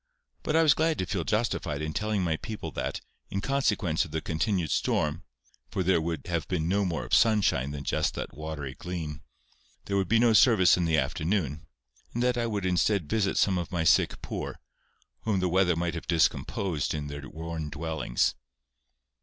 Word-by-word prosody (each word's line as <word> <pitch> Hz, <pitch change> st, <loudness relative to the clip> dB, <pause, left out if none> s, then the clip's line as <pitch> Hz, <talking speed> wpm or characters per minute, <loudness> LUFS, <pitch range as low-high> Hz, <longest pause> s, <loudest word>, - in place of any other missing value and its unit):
But 155 Hz, -, -1 dB
I 165 Hz, -, +5 dB
was 150 Hz, -4 st, +6 dB
glad 160 Hz, +2 st, +1 dB
to -, -, -1 dB
feel 90 Hz, -1 st, -2 dB
justified 105 Hz, -9 st, -1 dB
in 75 Hz, 0 st, -3 dB
telling 105 Hz, 0 st, 0 dB
my 80 Hz, -3 st, +1 dB
people 110 Hz, +4 st, -6 dB
that, -, -, -3 dB, 0.3 s
in 100 Hz, -, -2 dB
consequence 105 Hz, -, +1 dB
of 90 Hz, -, -8 dB
the 80 Hz, +1 st, -2 dB
continued 85 Hz, +1 st, -1 dB
storm, 75 Hz, +3 st, 0 dB, 0.5 s
for 95 Hz, -, -1 dB
there 90 Hz, -2 st, +3 dB, 0.2 s
had 85 Hz, -3 st, -2 dB
been 85 Hz, -4 st, -1 dB
no 100 Hz, +3 st, +2 dB
more 85 Hz, -4 st, -2 dB
of -, -, -8 dB
sunshine 100 Hz, -, +3 dB
than 70 Hz, 0 st, -5 dB
just -, -, 0 dB
that -, -, -5 dB
watery 75 Hz, -3 st, -5 dB
gleam, 80 Hz, -1 st, -5 dB, 0.6 s
there 100 Hz, -, -2 dB
would 95 Hz, -2 st, +1 dB
be 115 Hz, -, +4 dB
no 115 Hz, 0 st, +4 dB
service 105 Hz, -5 st, +6 dB
in 90 Hz, -, 0 dB
the 80 Hz, -1 st, +2 dB
afternoon, 75 Hz, +2 st, -1 dB, 0.5 s
and 120 Hz, -, 0 dB
that 125 Hz, 0 st, +2 dB
I 120 Hz, -1 st, 0 dB
would 105 Hz, -4 st, -2 dB
instead 90 Hz, 0 st, +1 dB
visit 100 Hz, +3 st, 0 dB
some 95 Hz, -3 st, +3 dB
of 85 Hz, -, -5 dB
my 85 Hz, -3 st, 0 dB
sick 80 Hz, -, +3 dB
poor, -, -, -5 dB, 0.6 s
whom 105 Hz, -4 st, 0 dB
the 90 Hz, -, +1 dB
weather 90 Hz, -1 st, +3 dB
might 85 Hz, 0 st, -1 dB
have 85 Hz, 0 st, -6 dB
discomposed 85 Hz, 0 st, 0 dB
in 75 Hz, -1 st, -3 dB
their 70 Hz, 0 st, -7 dB
worn 80 Hz, -1 st, -5 dB
dwellings. 80 Hz, -5 st, -1 dB
90 Hz, 185 wpm, -28 LUFS, 80-105 Hz, 0.6 s, was